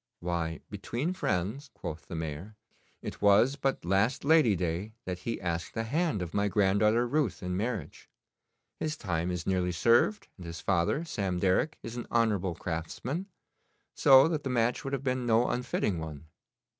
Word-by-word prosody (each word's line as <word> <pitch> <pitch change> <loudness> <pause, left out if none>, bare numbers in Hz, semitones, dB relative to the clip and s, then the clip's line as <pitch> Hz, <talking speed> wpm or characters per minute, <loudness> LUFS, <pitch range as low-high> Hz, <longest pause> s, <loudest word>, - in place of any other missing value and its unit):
'Why, 85 -2 -2
between 145 +10 -2
friends,' 115 - -2
quoth 75 -3 -7
the - - -6
Mayor, 80 +6 -5 0.5
'it - - -6
was 105 +7 +5
but 135 -8 -1
last 100 +9 +1
Lady 150 -9 +5
day 90 +4 -2
that 90 -1 -4
he 115 - -3
asked 85 -1 -3
the 115 - -1
hand 140 - 0
of 85 - -7
my 100 0 +2
granddaughter 105 +4 +3
Ruth 140 -7 0
in 90 0 -2
marriage. 105 - -4 0.7
His 155 -1 -2
time 85 - -2
is 90 -2 -3
nearly 90 -2 +1
served, 105 +3 +3
and 90 -3 -9
his 85 -1 -6
father, 95 - +1
Sam 95 - -2
Derrick, 95 - +1
is 115 +1 -6
an 120 - -5
honourable 105 -7 +1
craftsman, 105 - -4 0.7
so 135 0 +7
that 155 -3 -2
the 135 - -2
match 120 -1 +1
would 135 - -4
have 140 -1 -2
been 130 -2 -1
no 115 +1 +4
unfitting 105 -7 -1
one. 80 -1 -7
105 Hz, 170 wpm, -30 LUFS, 90-125 Hz, 0.7 s, so